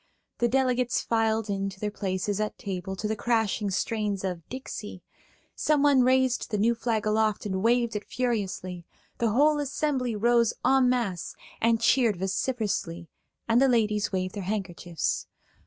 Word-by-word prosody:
The 240 - +3
delegates 250 -1 +1
filed 225 -1 +1
in 195 -1 -1
to 190 0 -12
their 210 0 -2
places 195 0 -2
at 215 - -3
table 190 -1 -5
to 210 +3 -3
the 220 - -1
crashing 220 -2 0
strains 205 0 -1
of 180 -3 -3
"Dixie"; 220 -7 -7 0.5
someone 290 -3 +3
raised 260 0 +2
the 210 - -1
new 225 +4 +3
flag 225 -2 -1
aloft 215 0 +1
and 190 -2 -2
waved 235 +1 +2
it 210 - -4
furiously; 195 -7 -2 0.4
the 235 - +2
whole 295 +7 +3
assembly 275 -4 -1
rose 235 +1 +3
en 265 -1 +4
masse 225 -9 -1 0.3
and 230 0 +3
cheered 230 -3 +3
vociferously, 190 -4 -2 0.4
and 230 +2 +4
the 270 - +5
ladies 215 -5 +1
waved 185 -1 -2
their 205 - -5
handkerchiefs. 180 - -3
220 Hz, 155 wpm, -27 LUFS, 195-245 Hz, 0.5 s, the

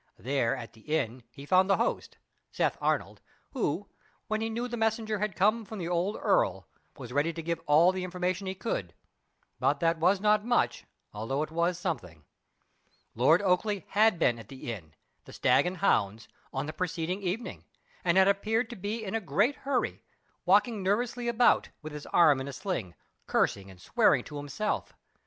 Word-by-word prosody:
There 135 -1 0
at 120 -3 -8
the 110 - -18
inn, 130 -4 -2
he 140 +3 -11
found 185 +4 +4
the 195 - +4
host - - -2 0.3
Seth - - 0
Arnold, - - -1 0.3
who, - - -2 0.4
when 215 0 -2
he 225 - -1
knew 235 +2 -3
the 240 - -4
messenger 220 -1 0
had 210 -2 -2
come 215 +4 +2
from 215 +1 -8
the 175 -3 -4
old 180 +4 0
earl, - - +1 0.3
was 125 -3 -8
ready 145 +4 +2
to 165 - -5
give 165 0 -2
all 160 +5 +6
the 185 -1 -4
information 185 +1 -2
he 190 - -3
could; 95 - -4 0.6
but 140 0 +2
that 165 0 +1
was 185 +4 +3
not 210 +1 +3
much, 240 +1 +1 0.3
although 115 +8 -2
it 155 - -7
was 170 +2 0
something. 90 - -5 0.9
Lord 155 - +4
Oakleigh 195 0 +1
had 215 -2 +4
been 120 -8 +2
at 110 - -11
the 130 -3 -6
inn 80 -7 -11 0.3
the - - -12
Stag 125 +7 +3
and 185 +1 -3
Hounds 110 - +1 0.2
on 135 +2 -3
the 155 - -5
preceding 180 +2 -2
evening, 200 +5 -4 0.4
and 175 0 +2
had 190 0 +6
appeared 220 +4 +1
to - - -6
be 210 +3 -4
in 190 - -4
a 225 - 0
great 200 - +1
hurry, 270 -2 -2 0.4
walking 230 -5 +3
nervously 235 +5 0
about, 235 +1 +3
with 155 0 -7
his 150 -1 -8
arm 150 -6 +5
in 135 - -5
a 140 - -6
sling, 125 - -4 0.3
cursing 100 -1 0
and 95 -2 -14
swearing - - +3
to 150 - -8
himself. 145 +9 -3
180 Hz, 185 wpm, -29 LUFS, 140-210 Hz, 0.9 s, all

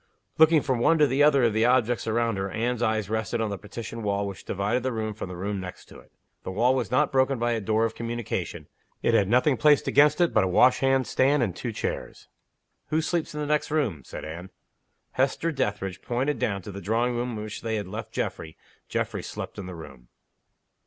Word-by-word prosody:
Looking 160 -1 +6
from 130 -3 0
one 165 +7 +4
to 150 - +5
the 135 +1 +1
other 145 -3 +5
of 115 -3 +3
the 110 +2 +2
objects 120 -2 +2
around 115 -1 0
her, 95 0 -2
Anne's 120 +3 -2
eyes 110 -3 0
rested 110 +2 -2
on 110 -2 -1
the 100 - -3
partition 115 +3 -7
wall 100 -1 -1
which 100 -2 -7
divided 105 +6 -1
the 130 +1 -1
room 110 -2 -3
from 100 -3 -7
the 90 - -6
room 100 +3 -3
next 90 -1 -8
to - - -13
it. - - -20 0.3
The - - -6
wall 115 +7 +2
was 130 -2 -1
not 125 - +2
broken 135 0 +2
by 120 +1 0
a 115 -1 -1
door 110 +2 +1
of 115 - -2
communication, 115 -1 -4 0.4
it - - +2
had 100 - +4
nothing 125 +5 +3
placed 150 +1 +4
against 150 +2 +4
it 175 -1 +3
but 110 - +4
a - - +1
wash 125 +8 +4
hand 135 -1 +2
stand 135 +1 +2
and 95 -6 -2
two 120 - -4
chairs. 105 - -5 0.6
"Who 155 - +1
sleeps 160 -1 -2
in 150 - -3
the - - -1
next 150 0 0
room?" 140 - 0
said - - -8
Anne. 85 +4 -7 0.6
Hester 135 +5 0
Dethridge 105 - -2
pointed 130 +2 -1
down 100 -4 -1
to 105 - -7
the 100 +1 -8
drawing 115 +5 0
room 120 -1 -2
in 105 - -5
which 110 0 -7
they 110 -1 -2
had 105 -3 -3
left 110 +4 -6
Geoffrey, 80 -1 -4 0.3
Geoffrey - - -2
slept - - -7
in 95 - -6
the 90 - -7
room. 70 -7 -12
115 Hz, 225 wpm, -26 LUFS, 100-130 Hz, 0.6 s, Looking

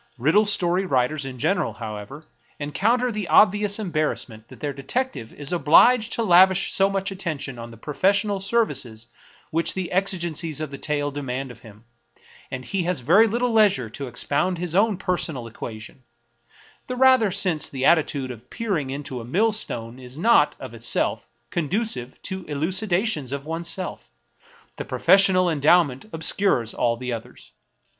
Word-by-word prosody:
Riddle 160 - +3
story 185 -2 +2
writers 140 -3 0
in 130 -1 -8
gen 195 +10 +1
eral, - - -2
however, 110 +6 -7 0.4
encounter 225 - 0
the 210 -4 -4
obvious 205 0 +4
embarrassment 155 - -3
that - - -14
their 145 -1 -3
detective 140 - -3
is 145 +3 -5
obliged 225 +8 +5
to 230 - 0
lavish 190 -1 +5
so 195 0 +3
much 195 0 -2
attention 155 -9 -5
on 115 0 -8
the 115 - -13
professional 195 - 0
services 145 - -1 0.5
which 165 +1 0
the 185 -2 -4
exigencies 170 -5 -1
of 155 -2 -4
the 140 - -8
tale 145 -1 -1
de 145 +1 -5
mand 135 0 -4
of 120 - -14
him, 110 0 -16 0.6
that 130 -1 -6
he 195 - -2
has 175 -5 -1
very 185 - +5
little 240 +2 0
leisure 190 - +3
to 140 +3 -6
expound 150 +8 -1
his 175 -1 -3
own 205 +1 +2
personal 170 -9 -2
equation 110 +1 -9 0.4
— 120 - -28
the 255 - -4
rather 260 -4 +5
since 180 -5 0
the 135 -1 -3
attitude 145 -5 +2
of 120 +1 -12
peering 195 - -2
into 135 -2 -5
a - - -8
millstone 130 - -1
is 125 +1 -10
not, 230 +8 +4
of - - -9
itself, - - -1 0.2
conducive 175 - -2
to 190 -1 -4
eluci 165 +9 -2
dations 175 - 0
of 140 0 -5
oneself; 170 +3 -4 0.7
the - - -4
professional 190 -2 +4
endowment 150 -3 +3
obscures 160 - +1
all 115 -1 0
the 125 0 -4
others. 65 - -9
165 Hz, 160 wpm, -23 LUFS, 130-195 Hz, 0.7 s, obliged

